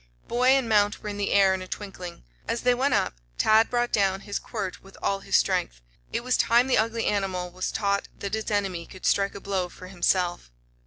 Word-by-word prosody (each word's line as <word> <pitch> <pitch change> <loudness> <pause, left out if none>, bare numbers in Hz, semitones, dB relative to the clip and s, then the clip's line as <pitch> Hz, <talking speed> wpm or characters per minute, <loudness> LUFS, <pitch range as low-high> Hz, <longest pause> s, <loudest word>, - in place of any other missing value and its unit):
Boy 245 +1 +1
and 265 -2 +4
mount 210 -1 +2
were 210 - -4
in 205 - -5
the 205 - -1
air 195 -1 +5
in 190 - -3
a 185 - -7
twinkling. 185 - -7 0.2
As 235 - -1
they 250 0 +4
went 265 +3 +1
up, - - +1 0.2
Ted 220 +1 +4
brought 240 0 0
down 195 -2 +2
his 205 -1 -3
quirt 200 -5 -5
with 195 - -16
all 195 - 0
his - - -2
strength. - - 0 0.3
It 235 - -2
was 255 0 +1
time 235 +2 +4
the 265 - +2
ugly 230 +1 +1
animal 190 -3 -1
was 185 +1 -3
taught 200 -2 0
that 200 0 -5
its 220 0 -2
enemy 195 -5 -1
could 185 - -10
strike 200 0 +2
a - - -6
blow 190 -2 -2
for 185 +1 -12
himself. 175 - 0
200 Hz, 220 wpm, -26 LUFS, 190-225 Hz, 0.3 s, air